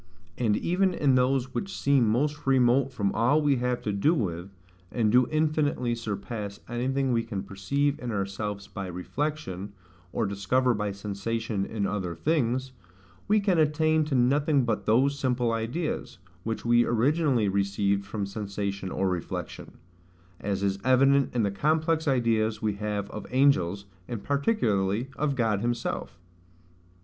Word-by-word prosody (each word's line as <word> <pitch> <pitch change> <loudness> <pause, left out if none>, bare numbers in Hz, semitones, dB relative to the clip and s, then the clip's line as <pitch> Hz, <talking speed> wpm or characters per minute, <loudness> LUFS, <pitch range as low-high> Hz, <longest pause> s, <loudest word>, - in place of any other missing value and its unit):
And 110 -3 +1
even 185 - +1
in 140 -3 +3
those 130 0 +1
which 195 -1 -4
seem 135 -4 +3
most 145 +6 0
remote 130 0 +3
from 100 -6 -1
all 125 +7 +3
we 145 -3 +2
have 125 0 -1
to 105 - -1
do 145 +13 +2
with, 90 - -3 0.4
and 110 -3 +1
do 125 +1 +5
infinitely 150 -5 +1
surpass 105 -2 -5
anything 130 +3 -1
we 115 - +2
can 105 -4 -5
perceive 140 +9 -1
in 125 - -5
ourselves 100 0 -3
by 100 -1 -6
reflection; 100 - -4 0.4
or - - 0
discover 100 +6 +1
by 105 -1 -2
sensation 100 +1 -3
in 105 -3 -2
other 95 -4 -2
things, 130 - 0 0.6
we 215 +1 +4
can 195 -4 +2
attain 155 +1 +3
to 150 -3 -2
nothing 140 +2 +3
but 115 -3 -2
those 135 +6 +3
simple 125 -3 +1
ideas, 115 - -3 0.3
which 110 0 -4
we 120 0 +5
originally 130 -1 +2
received 100 0 0
from 100 0 -4
sensation 100 -1 -4
or 95 - -1
reflection; 90 -2 -5 0.6
as 100 -1 -2
is 100 0 0
evident 135 +1 +4
in 120 - +2
the 100 - +1
complex 160 - +1
ideas 115 -4 +1
we 105 -1 0
have 105 0 -3
of - - -7
angels, 100 -8 +2 0.2
and 115 -4 -5
particularly 120 - 0
of 145 -2 0
God 110 -5 +1
himself. 120 -6 -3
120 Hz, 150 wpm, -27 LUFS, 100-140 Hz, 0.6 s, do